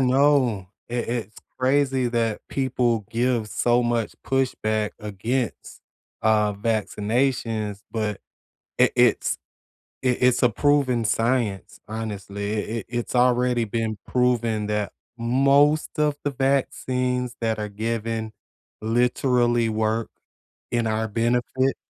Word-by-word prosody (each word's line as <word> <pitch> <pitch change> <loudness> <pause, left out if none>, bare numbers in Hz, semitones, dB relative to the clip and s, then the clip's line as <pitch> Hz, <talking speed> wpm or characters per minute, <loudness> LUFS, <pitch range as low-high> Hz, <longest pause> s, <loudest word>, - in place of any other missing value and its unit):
know 130 -7 +3 0.2
i - - -4
it's 115 -3 -3 0.2
crazy 130 -1 +2
that 115 -2 0
people 120 -5 0
give 120 -1 +1
so 120 +3 +2
much 120 -2 -1
pushback 110 -5 0
against, 110 +4 -3 0.4
uh, 105 -1 +3
vaccinations, 110 0 -1
but 105 -3 -2 0.6
i - - +6
it's - - +3 0.7
i - - +1
it's 125 0 +4
a 125 - +6
proven 130 -2 +2
science, 115 -2 0
honestly, 100 -2 -4
i 105 - 0 0.2
it - - -9
it's 120 +1 -3
already 125 -1 +3
been 110 0 -2
proven 120 -4 +1
that 105 -1 -1 0.3
most 140 +7 +3
of 150 -1 +2
the 145 - 0
vaccines 125 -2 0
that 110 -2 0
are 105 - -3
given 110 +1 -3 0.5
literally 120 0 +2
work 110 +1 0 0.6
in 120 -1 +1
our 110 0 0
benefit. 120 +4 +1
120 Hz, 110 wpm, -24 LUFS, 110-125 Hz, 0.7 s, i